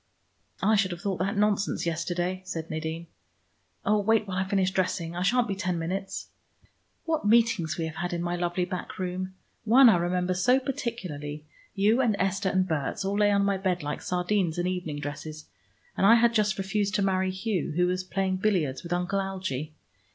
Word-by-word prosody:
"I 215 +3 +4
should 200 -2 +2
have 175 -1 -6
thought 195 -4 -2
that 195 +3 -1
nonsense 205 -3 +1
yesterday," 175 +2 -2
said 165 -3 -5
Nadine. 160 +1 -4 0.8
"Oh, 210 +1 +3
wait 220 +1 +2
while 185 -1 -3
I 190 - 0
finish 190 -1 +1
dressing; 180 -3 -1
I 175 - -3
shan't 235 +6 +2
be 200 - -1
ten 185 -2 -2
minutes. 190 +4 -4 0.8
What 320 -10 0
meetings 220 -6 +3
we 165 - -1
have 160 +1 -6
had 175 -2 -2
in 170 0 -2
my 175 0 -1
lovely 175 +1 -1
back 180 0 -6
room! 185 0 -4 0.3
One, 240 +3 +7
I 210 - +5
remember 180 +1 0
so 220 +9 +3
particularly. 175 - -5 0.3
You 210 +5 +3
and 230 -5 +2
Esther 195 +1 0
and 185 0 +1
Berts 160 +3 -2
all 200 +1 0
lay 205 0 +5
on 200 -1 +3
my 200 -1 +1
bed 185 -3 -1
like 145 0 -4
sardines 180 -1 0
in 175 - 0
evening 180 -5 -3
dresses, 155 +1 -6 0.5
and - - -1
I 225 +4 +8
had 235 0 +4
just 215 -1 +2
refused 195 0 -1
to 200 - +2
marry 190 -1 +1
Hugh, 190 -4 -2
who 180 +1 +3
was 185 +1 -1
playing 190 0 -1
billiards 175 -10 0
with 170 - -9
Uncle 180 +3 0
Algie. 185 -7 -4
185 Hz, 195 wpm, -27 LUFS, 175-200 Hz, 0.8 s, I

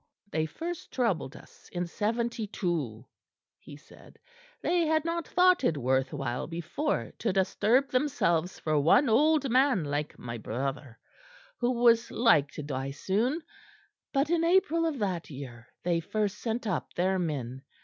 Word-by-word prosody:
"They 160 0 0
first 335 - -6
troubled 195 - -1
us - - -16
in 175 0 -2
'72," 195 - -2 0.5
he - - -12
said; - - -18 0.4
"they 340 -2 +1
had 315 0 +2
not 335 -1 -2
thought 360 -3 +4
it 160 - +2
worth 130 0 +1
while 135 -4 -3
before 170 - -2
to 225 - 0
disturb 210 +7 +2
themselves 185 - +1
for 155 -2 0
one 230 - +4
old 290 +3 +3
man 255 - +3
like 145 +1 -3
my 120 -1 -6
brother, 130 +2 -4 0.6
who 240 - +1
was 235 -1 +5
like 220 - +4
to 150 - -6
die 135 -1 -3
soon; 225 - -1 0.7
but 280 +3 +1
in 335 -1 +2
April 335 -2 +3
of 310 -4 -2
that 185 -6 -2
year 125 -4 -9 0.2
they 170 -1 +1
first 210 +4 -2
sent 230 0 -3
up 190 -7 -3
their 185 +2 +1
men. 135 -7 -3
190 Hz, 150 wpm, -29 LUFS, -, 0.7 s, was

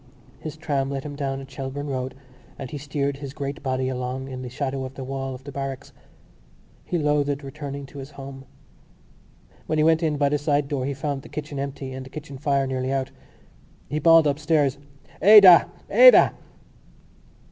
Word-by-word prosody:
His 155 0 -7
tram 140 -3 -1
let 135 -1 -4
him 145 -1 -7
down 135 -1 -3
at 135 0 -12
Shelbourne 135 +1 -5
Road 130 0 -4 0.4
and 135 -3 -7
he 145 - -5
steered 140 0 -2
his 140 0 -8
great 140 +1 -5
body 130 -1 -1
along 130 +1 -4
in 130 -1 -6
the 125 - -6
shadow 135 +1 -3
of 130 +1 -7
the 135 - -6
wall 135 0 -4
of 125 - -13
the 140 - -8
barracks. 135 -1 -6 0.9
He 175 - -2
loathed 145 -2 0
returning 140 0 -7
to 140 +1 -11
his 135 +1 -8
home. 135 -2 -10 1.2
When 155 - 0
he 155 - +3
went 160 +1 +4
in 155 -3 0
by 140 -1 +2
the 150 0 0
side 145 -1 +1
door 135 -2 -2
he 140 - -3
found 140 -1 -3
the - - -14
kitchen 145 -2 -6
empty 135 -1 -5
and 130 0 -6
the 130 - -11
kitchen 140 -2 -9
fire 140 -1 +1
nearly 130 0 -2
out. 135 -1 -2 0.8
He 150 +2 -1
bawled 165 +1 +6
upstairs: 145 -1 +1 0.4
"Ada! 195 -3 +9 0.2
Ada!" - - +7
140 Hz, 185 wpm, -24 LUFS, 135-150 Hz, 1.2 s, Ada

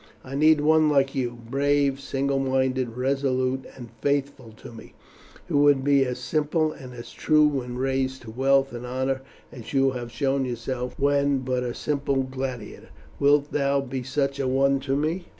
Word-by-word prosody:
I 130 - -9
need 155 +1 +4
one 155 0 +4
like 135 -2 +2
you, 120 -2 -2
brave, 140 +1 +1
single 135 0 -1
minded, 130 -2 0
resolute, 130 0 0
and 120 -3 -10
faithful 140 -4 -1
to 110 - -12
me, 115 - -13 0.5
who 155 -5 +1
would 145 -2 +4
be 140 -1 +4
as 125 -1 -3
simple 155 0 0
and 130 -4 -11
as 120 - -9
true 155 -1 +3
when 125 -4 -3
raised 130 0 -1
to 110 - -9
wealth 135 +2 +2
and 120 0 -6
honour 130 +1 -2 0.3
as 120 +1 -10
you 135 -1 +3
have 120 -2 -6
shown 135 +3 0
yourself 125 0 -4
when 140 -1 +2
but 130 -1 -1
a 120 -1 -3
simple 140 -2 -1
gladiator. 130 -4 -6 0.3
Wilt 145 +1 +3
thou 140 -1 +1
be 135 -1 -4
such 140 +2 -2
a 135 - 0
one 135 +1 +2
to 135 0 -2
me?" 160 +5 -2
135 Hz, 175 wpm, -25 LUFS, 130-140 Hz, 0.5 s, need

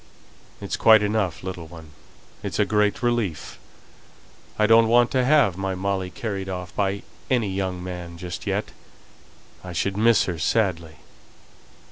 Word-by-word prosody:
"It's - - -3
quite 110 -2 +6
enough, 100 -5 -1
little 90 -3 -6
one. 80 -2 -13 0.5
It's - - -4
a 105 - +3
great 105 +2 +1
relief. 120 -9 -2 1.0
I 105 - +3
don't 115 +1 +6
want 120 +1 +4
to 130 -1 +2
have 130 - +3
my 95 -1 -2
Molly 95 0 -2
carried 95 0 -5
off 90 -2 -6
by 100 0 -1 0.3
any 120 -6 +1
young 95 -2 -3
man 90 -2 -7
just 90 -1 -7
yet; - - -2 0.9
I 90 -1 -7
should 95 +4 -1
miss 115 +1 +4
her 85 -3 -4
sadly." 85 -4 0
95 Hz, 145 wpm, -24 LUFS, 90-110 Hz, 1.0 s, quite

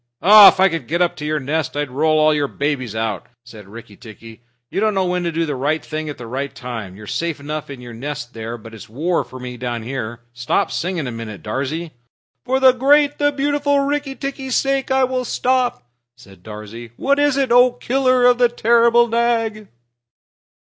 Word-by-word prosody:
"If 205 0 +9
I 190 - +6
could 165 -9 -4
get 170 +4 +1
up 175 - -1
to 150 - -6
your 155 0 0
nest, 145 0 -3
I'd 145 -3 -2
roll 155 +2 +3
your 145 -1 0
babies 135 -6 -3
out!" 110 -1 -3 0.2
said 110 -5 -13
Rikki 110 0 -12
tikki. 115 +1 -13 0.3
"You - - -2
don't 215 0 +1
know 190 -1 +1
when 180 0 -1
to 170 - -1
do 165 +1 -1
the 150 - -3
right 145 +5 -1
thing 155 0 -5
at 145 - -7
the 120 - -9
right 135 +4 -5
time. 115 -7 -7
You're 105 +1 -11
safe 165 +7 -3
enough 150 +1 -6
in 135 -3 -9
your 120 -1 -10
nest 125 +1 -6
there, 115 +1 -6
but 115 0 -13
it's 110 - -11
war 155 +7 -1
for 130 +1 -12
me 125 -1 -7
down 120 -2 -4
here. 120 -2 -5
Stop 120 +1 -1
singing 175 -3 -2
a 125 - -4
minute, 115 -4 -8
Darzee." 140 +9 -4 0.5
"For 260 +1 +1
the 260 -1 +7
great, 285 +3 +3
the 290 0 +2
beautiful 285 0 +1
Rikki 280 -1 -2
tikki's 270 -2 -4
sake 275 0 0
I 265 0 +2
will 255 0 -1
stop," 245 - -1 0.3
said 100 -6 -17
Darzee. 110 +3 -10
"What 280 +1 +1
is 290 -2 +2
it, 270 -3 0
O 245 +1 +6
Killer 255 0 +1
of 245 0 +4
the 245 -1 +4
terrible 235 0 +3
Nag?" 225 -2 0
155 Hz, 205 wpm, -19 LUFS, -, 0.5 s, If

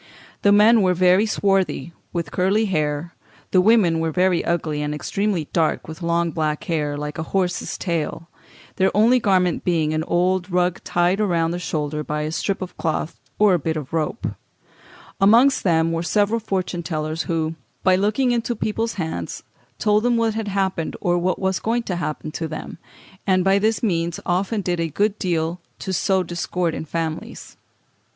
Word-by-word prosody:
The 205 - +4
men 215 +2 +6
were 185 -1 +3
very 185 +4 +4
swarthy, 195 -5 0 0.2
with 170 -4 -3
curly 195 +4 +2
hair; 155 -3 -1 0.4
the 185 - +5
women 190 -6 +4
were 165 0 0
very 180 +2 +2
ugly, 160 -3 -1
and 150 0 -2
extremely 195 0 -1
dark, 160 -2 +1
with 160 +3 -9
long 170 0 +1
black 155 -1 -1
hair, 150 -3 -1
like 150 +2 -5
a 160 - -5
horse's 180 -1 -1
tail; 165 -2 -3 0.5
their 190 0 +4
only 235 +4 +5
garment 185 -6 +2
being 160 -3 +1
an 155 0 0
old 180 +2 +1
rug 180 -1 +1
tied 175 +3 +1
round 170 -5 +1
the 175 - -3
shoulder 150 -2 -2
by 150 0 -3
a 155 - -3
strip 195 +3 -2
of 185 - -9
cloth 160 0 -2 0.2
or 210 -2 +5
a 175 - +2
bit 160 +1 -2
of 150 0 -7
rope 160 +7 -2
(Fig. - - -1 0.9
371). 195 0 +5
Amongst 250 +5 +5
them 165 -2 +2
were 165 0 -1
several 210 +5 +1
fortune 190 -4 -2
tellers, 155 -1 -3
who, 160 -1 0 0.3
by 185 -1 +5
looking 210 +7 +1
into 240 0 -1
people's 225 +2 -2
hands, 160 - -4 0.3
told 210 0 +2
them 240 0 +2
what 225 -1 +1
had 220 -1 -3
happened 190 -4 -1
or 175 0 +1
what 180 +1 0
was 190 -1 0 0.3
to 180 - -2
happen 155 -2 -4
to 165 +1 -4
them, 155 - -7 0.5
and 185 -1 +3
by 195 +1 +4
this 220 +3 0
means 170 -5 0
often 195 +4 0
did 175 -2 -1
a 165 -1 -1
good 205 +6 0
deal 170 -1 -1 0.2
to 190 - -4
sow 190 0 +2
discord 175 0 -2
in 160 - -5
families. 160 0 -5
180 Hz, 180 wpm, -22 LUFS, 160-195 Hz, 0.9 s, men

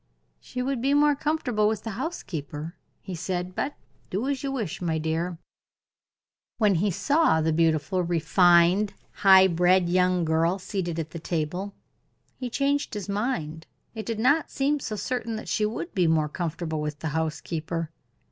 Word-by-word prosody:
"She 250 - -5
would 265 -2 -1
be 275 +3 +2
more 295 0 +4
comfortable 275 -8 0
with 215 -1 -1
the 225 - -4
housekeeper," 165 - -5 0.3
he 190 - -6
said; 180 +1 -3
"but 280 +9 -2 0.3
do 210 +8 -2
as 275 -2 -1
you 275 - -2
wish, 225 - -3
my 165 -2 0
dear." 165 +2 -2 1.2
When 210 -3 +4
he 190 +4 +1
saw 285 - +2
the 160 0 +1
beautiful, 160 +2 +2
refined, 175 +3 +4 0.2
high 190 -1 +7
bred 180 0 +3
young 180 -1 +2
girl 165 +3 +2
seated 180 -3 -3
at 160 -1 -4
the 170 - -6
table, 175 +5 -3 0.6
he 250 -2 -5
changed 280 +1 0
his 205 -1 -5
mind 185 -7 -2 0.3
it 220 -1 -6
did 230 -2 -2
not 285 +8 +2
seem 285 +2 0
so 220 -5 -4
certain 230 +1 -3
that 220 - -7
she 210 - +1
would 230 +10 -5
be 180 -3 +2
more 155 -2 +2
comfortable 160 -1 -3
with 150 -1 -3
the 160 - -4
housekeeper. 160 +1 -3
185 Hz, 165 wpm, -26 LUFS, 165-230 Hz, 1.2 s, high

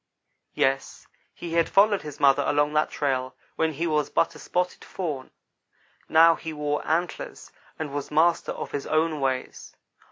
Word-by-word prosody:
Yes, 135 0 0 0.3
he 170 -1 -7
had 170 -1 +2
followed 205 0 +4
his 150 -1 -9
mother 140 0 +5
along 145 +1 +2
that 150 0 +2
trail 130 -3 -2 0.2
when 160 -1 0
he 160 +4 -2
was 150 -3 0
but 165 - +1
a 150 - -13
spotted 180 +3 -2
fawn 150 -8 -5 0.8
now 165 +1 +7
he 160 0 -6
wore 150 -1 -2
antlers, 170 +3 -3 0.3
and 150 -3 -5
was 145 -1 -4
master 165 +3 +2
of - - -6
his 140 - -4
own 155 0 +1
ways. 130 -1 -3
150 Hz, 160 wpm, -25 LUFS, 145-165 Hz, 0.8 s, now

